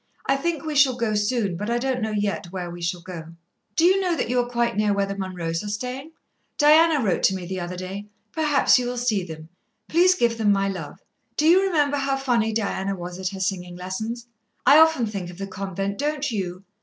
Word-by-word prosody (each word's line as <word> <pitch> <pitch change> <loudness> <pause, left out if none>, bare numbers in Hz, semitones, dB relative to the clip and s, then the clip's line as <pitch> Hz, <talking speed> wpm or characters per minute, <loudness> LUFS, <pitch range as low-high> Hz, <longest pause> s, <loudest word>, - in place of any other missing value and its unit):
I 270 - +2
think 325 +2 -2
we 310 - -2
shall 275 -3 +4
go 230 -3 0
soon, 210 -2 0
but 210 +6 -4
I 235 - +1
don't 255 0 -1
know 220 - -1
yet 205 -3 -2
where 180 -2 -5
we 175 0 -9
shall 170 +1 -2
go. 170 -2 -8 0.5
"Do 330 - +3
you 380 +2 +4
know 360 -3 +1
that - - -1
you 250 - +2
are 245 0 -1
quite 235 -3 0
near 210 0 +2
where 200 0 +1
the 195 - -4
Munroes 180 -4 -3
are 205 - -5
staying? 255 +8 -5 0.4
Diana 305 -1 +5
wrote 190 - +1
to 190 - +3
me 185 -2 -5
the 185 +1 -4
other 175 +1 -5
day. 190 +3 -6 0.2
Perhaps 295 -3 +3
you 245 - -2
will 245 0 -3
see 230 -6 0
them. 160 -2 -9 0.4
Please 360 +3 +4
give 235 -8 +1
them 210 -2 +3
my 195 0 +2
love. 180 -7 -6 0.4
Do 305 - +2
you 360 +3 +6
remember 300 -7 +1
how 275 -1 0
funny 240 -5 +1
Diana 195 -3 -1
was 175 0 -7
at 185 -1 -1
her 195 -1 -8
singing 180 -2 -2
lessons? 220 +7 -5 0.4
I 290 +3 +8
often 320 -6 +5
think 200 -5 -5
of 175 - -11
the 195 - -4
convent, 195 0 -4
don't 295 -1 -1
you? 185 -3 -4
215 Hz, 230 wpm, -24 LUFS, 190-270 Hz, 0.5 s, I